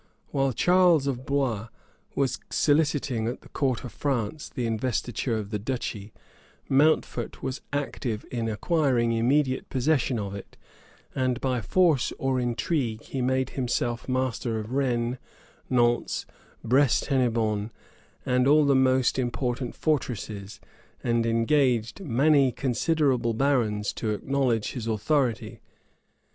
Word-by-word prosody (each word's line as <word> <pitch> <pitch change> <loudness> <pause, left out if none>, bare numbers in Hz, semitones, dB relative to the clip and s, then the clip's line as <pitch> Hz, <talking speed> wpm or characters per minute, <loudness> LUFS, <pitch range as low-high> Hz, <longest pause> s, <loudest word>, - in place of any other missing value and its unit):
While 135 -1 +1
Charles 175 +2 +4
of 130 -1 -3
Blois 130 -7 0 0.5
was 135 -2 0
soliciting 145 -6 +1
at 120 - -4
the - - -16
court 130 -5 -1
of 125 - -7
France 140 +1 -2
the 125 - -3
investiture 115 +1 -1
of 105 -1 -5
the 105 - -2
duchy, 110 -3 -4 0.6
Mountfort 150 +4 +1
was 130 0 -3
active 130 -6 -3
in 115 -2 -2
acquiring 125 - +1
immediate 130 +4 +1
possession 135 -1 +1
of 100 -2 -4
it; 100 - -10 0.6
and 130 -2 0
by 130 -3 -1
force 165 - +2
or 135 -1 0
intrigue 120 -1 -1
he 135 - -4
made 130 +1 0
himself 120 -1 -2
master 130 -3 -1
of 110 +2 -7
Rennes, 125 -2 0 0.5
Nantz, 120 -1 +1 0.4
Brest 130 +2 +3
Hennebonne, 115 -6 0 0.6
and 125 0 +2
all 150 +1 +5
the 140 - +4
most 130 -1 +3
important 125 0 -2
fortresses, 110 -9 -2 0.4
and 115 -1 +1
engaged 120 - +1
many 140 -1 +3
considerable 130 -2 +1
barons 115 -6 +1
to 110 - -3
acknowledge 130 -3 0
his 120 -4 -5
authority. 120 +2 0
125 Hz, 125 wpm, -26 LUFS, 115-140 Hz, 0.6 s, all